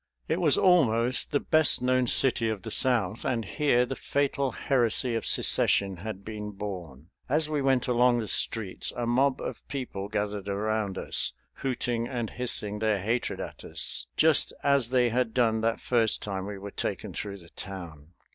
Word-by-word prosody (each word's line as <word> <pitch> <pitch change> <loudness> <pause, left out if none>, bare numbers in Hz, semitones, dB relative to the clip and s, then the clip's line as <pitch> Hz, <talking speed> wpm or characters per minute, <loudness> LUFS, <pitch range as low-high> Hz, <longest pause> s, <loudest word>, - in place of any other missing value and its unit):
It - - -1
was - - +4
almost 125 -9 +3
the 145 - +2
best 155 -5 +3
known 130 0 +2
city 115 -2 +4
of 105 -4 -4
the 110 - -6
South 115 -5 +1
and 115 -3 -1
here 125 +2 +2
the 135 +2 -5
fatal 140 0 -1
heresy 125 -2 +1
of 115 -2 -1
secession 95 -2 +3
had 100 +1 -7
been 105 -1 -6
born. 90 -6 -8 0.2
As 150 +3 +2
we 150 -2 -1
went 135 -2 +1
along 125 0 +3
the 115 -2 -3
streets 105 -3 0
a 120 - -1
mob 130 +3 +2
of - - -6
people 125 -8 -5
gathered 105 -1 -3
around 105 -1 -2
us, - - 0 0.2
hooting 120 -3 -2
and 120 -4 -4
hissing 105 -4 0
their 110 -1 +1
hatred 115 +6 -2
at - - -7
us, - - -1
just - - +4
as 140 -4 +3
they 125 -1 +3
had 120 -1 -1
done 115 -3 +2
that 115 0 0
first 115 -3 +1
time 95 -1 -4
we 100 -1 -6
were 100 +1 -8
taken - - -4
through 100 -1 -5
the 85 -3 -16
town. 85 -5 -9
115 Hz, 175 wpm, -27 LUFS, 100-125 Hz, 0.2 s, was